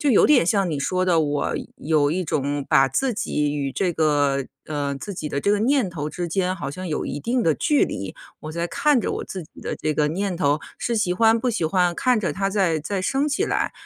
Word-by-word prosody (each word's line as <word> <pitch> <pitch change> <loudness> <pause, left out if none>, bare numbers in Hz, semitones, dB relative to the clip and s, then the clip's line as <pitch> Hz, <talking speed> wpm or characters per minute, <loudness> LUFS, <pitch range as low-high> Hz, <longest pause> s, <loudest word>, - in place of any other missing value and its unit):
就 290 - +2
有 220 - +6
点 285 - +5
像 195 -2 +2
你 150 -3 -2
说 185 +5 0
的， 170 -3 +3
我 145 -1 -1 0.2
有 150 -1 +1
一 180 +2 -1
种 145 -1 -1
把 135 0 +5
自 250 - 0
己 150 -7 -1
与 140 -2 -2
这 180 +5 0
个， 145 -4 +1 0.2
呃， 145 -2 -2
自 200 +8 -6
己 155 -3 -4
的 140 - -2
这 200 - +1
个 205 - +3
念 250 -5 +2
头 150 -3 -4
之 175 +2 -4
间 185 +2 -1
好 140 -5 -4
像 185 +4 -6
有 155 - -2
一 145 - -4
定 240 - 0
的 160 -2 +3
距 295 -2 +2
离， 95 0 -5 0.3
我 155 0 -7
在 170 +1 -2
看 295 +7 +2
着 - - -2
我 - - -4
自 185 -3 -6
己 155 - -15
的 - - -4
这 155 - -1
个 150 0 +1
念 190 +3 -2
头， 145 -3 +2 0.2
是 235 -1 -1
喜 180 -4 +1
欢 225 +4 +4
不 245 +2 0
喜 215 -8 -1
欢， 180 0 +2
看 250 +5 +2
着 195 - -1
它 195 +1 -1
在 185 -6 +1
在 190 +4 -3
升 275 +8 +1
起 340 +8 0
来， - - -1
175 Hz, 265 characters per minute, -23 LUFS, 150-205 Hz, 0.3 s, 有